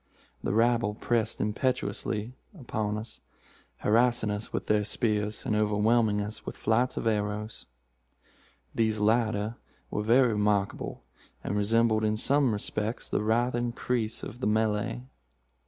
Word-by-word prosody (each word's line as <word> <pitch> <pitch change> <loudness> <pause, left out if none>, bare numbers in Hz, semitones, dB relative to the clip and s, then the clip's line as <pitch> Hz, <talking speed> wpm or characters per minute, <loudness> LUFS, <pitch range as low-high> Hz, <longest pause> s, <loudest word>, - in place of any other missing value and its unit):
The - - 0
rabble 115 -1 +2
pressed 115 -1 0
impetuously 110 -1 -1 0.3
upon 110 -4 -2
us, 110 +2 -8 0.6
harrassing 115 0 +3
us 105 +1 -4
with - - -3
their 105 -1 +2
spears, 105 -1 -1
and 105 - 0
overwhelming 105 0 +2
us 105 +1 -6
with - - -7
flights 120 +3 +1
of - - -2
arrows. 105 0 -2 1.1
These 110 -1 +1
latter 110 0 +1 0.3
were 105 - -1
very 120 +4 +4
remarkable, 105 -2 0 0.4
and 100 - -2
resembled 110 +1 +2
in 110 0 +1
some 140 +2 +3
respects 105 +2 -3
the - - 0
writhing 120 +2 +1
creese 115 -3 -2
of 120 - -7
the 130 - -1
Malay. 110 +2 0
110 Hz, 130 wpm, -28 LUFS, 105-115 Hz, 1.1 s, very